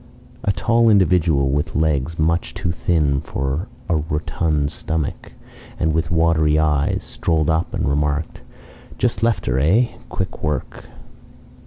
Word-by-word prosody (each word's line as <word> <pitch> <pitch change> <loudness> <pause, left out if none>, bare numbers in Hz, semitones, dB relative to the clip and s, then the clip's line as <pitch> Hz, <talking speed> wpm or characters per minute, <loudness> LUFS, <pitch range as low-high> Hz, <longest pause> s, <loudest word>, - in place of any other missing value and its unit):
A 100 - +2
tall 115 +3 +3
individual, 90 -9 +3
with 75 +3 -1
legs 80 0 0
much 85 +2 0
too 85 - -2
thin 75 -5 +1
for 70 +8 -3 0.2
a 85 - +2
rotund 75 -1 -1
stomach, 80 -3 -4 0.5
and 80 0 +1
with 80 0 0
watery 80 -2 +3
eyes, 75 -2 +1
strolled 80 -2 0
up 80 +2 0
and - - -1
remarked, 75 +2 -1 0.6
"Just - - 0
left 115 -1 +1
her - - +1
eh? 100 - +3 0.2
Quick - - -4
work." 75 -3 -4
80 Hz, 135 wpm, -20 LUFS, 75-85 Hz, 0.6 s, tall